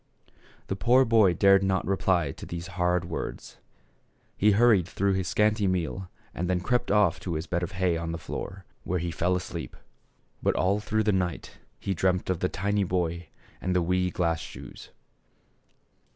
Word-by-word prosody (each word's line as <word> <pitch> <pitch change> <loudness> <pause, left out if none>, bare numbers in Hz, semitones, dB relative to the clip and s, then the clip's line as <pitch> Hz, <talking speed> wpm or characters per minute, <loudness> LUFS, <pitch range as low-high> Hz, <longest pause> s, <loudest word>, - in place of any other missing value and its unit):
The 95 - -3
poor 125 +6 +4
boy 110 -6 +4
dared 100 +2 +5
not 95 -1 0
reply 90 -5 +1
to - - -10
these 85 0 -5
hard 90 -1 +1
words; 85 - -6 0.8
he 105 +1 +4
hurried 105 -5 +4
through 100 0 0
his 95 -2 -1
scanty 105 0 +2
meal 90 0 -2 0.2
and 90 +1 -3
then 90 -1 +1
crept 125 +7 0
off 100 -5 +3
to 85 -3 -4
his 80 +2 -3
bed 85 -1 -1
of 90 +2 -4
hay 90 -2 +1
on 85 0 -3
the 80 - -3
floor, 95 +3 -7 0.2
where 90 - -1
he 85 0 -2
fell 90 +2 0
asleep. 90 -1 -5 0.6
But - - +1
all 100 +3 +2
through 110 +1 0
the 105 - +2
night 90 -3 -2 0.2
he 100 - -2
dreamed 90 +1 0
of 90 - -2
the 90 - 0
tiny 100 +2 0
boy 85 -2 -2 0.3
and 95 0 -1
the 90 - +3
wee 90 +1 +1
glass 85 -2 0
shoes. - - -10
90 Hz, 180 wpm, -27 LUFS, 85-100 Hz, 0.8 s, dared